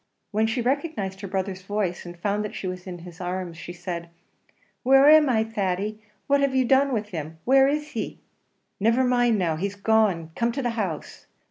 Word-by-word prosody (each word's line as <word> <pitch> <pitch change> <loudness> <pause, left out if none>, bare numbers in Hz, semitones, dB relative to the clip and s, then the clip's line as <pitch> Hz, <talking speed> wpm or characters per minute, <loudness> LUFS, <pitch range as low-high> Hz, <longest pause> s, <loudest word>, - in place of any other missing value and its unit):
When 220 +1 +2
she 235 +2 -1
recognised 250 - -2
her 200 - -5
brother's 190 0 -3
voice, 195 -3 -2
and 175 0 -9
found 205 +4 -1
that 210 - -6
she - - -5
was 185 0 -5
in 180 -1 -6
his 175 +1 -11
arms, 180 -1 -4
she 165 - -8
said, 175 -1 -6 0.7
"Where 270 +2 +6
am 305 -1 +7
I, 220 -3 +3
Thady? 210 -1 -2 0.2
What 280 0 +3
have 275 -1 +1
you 260 -1 +3
done 270 +2 +4
with 215 -4 -2
him? 160 -3 -6
Where 270 +1 +6
is 300 +1 -1
he?" - - -4 0.6
"Never 230 +5 +3
mind 245 -3 +3
now. 165 -5 0
He's 200 +4 -3
gone 200 -6 +2
come 235 +4 0
to 275 +1 -3
the 240 - 0
house." 195 -9 -4
210 Hz, 200 wpm, -25 LUFS, 180-250 Hz, 0.7 s, am